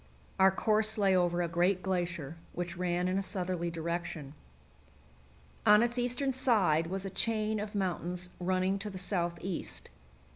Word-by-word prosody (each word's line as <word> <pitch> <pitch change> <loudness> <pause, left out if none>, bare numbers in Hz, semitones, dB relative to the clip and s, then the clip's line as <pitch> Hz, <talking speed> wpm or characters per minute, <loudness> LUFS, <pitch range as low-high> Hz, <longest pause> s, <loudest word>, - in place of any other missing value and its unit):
Our 190 0 +7
course 215 +3 +1
lay 195 -2 +4
over 175 -1 +2
a - - 0
great 175 +3 +1
glacier, 175 -5 -2 0.2
which 175 0 -4
ran 180 0 0
in 185 +1 +1
a - - 0
southerly 180 -3 -2
direction. 165 -3 -4 1.3
On 210 +2 +7
its 240 +1 0
eastern 250 +3 0
side 205 - +3
was 190 +2 -4
a - - -2
chain 215 +1 0
of 210 +1 -5
mountains 180 -2 -2
running 185 +2 +1
to 210 - -4
the 190 - -7
southeast. 180 -1 -2
185 Hz, 150 wpm, -31 LUFS, 175-210 Hz, 1.3 s, Our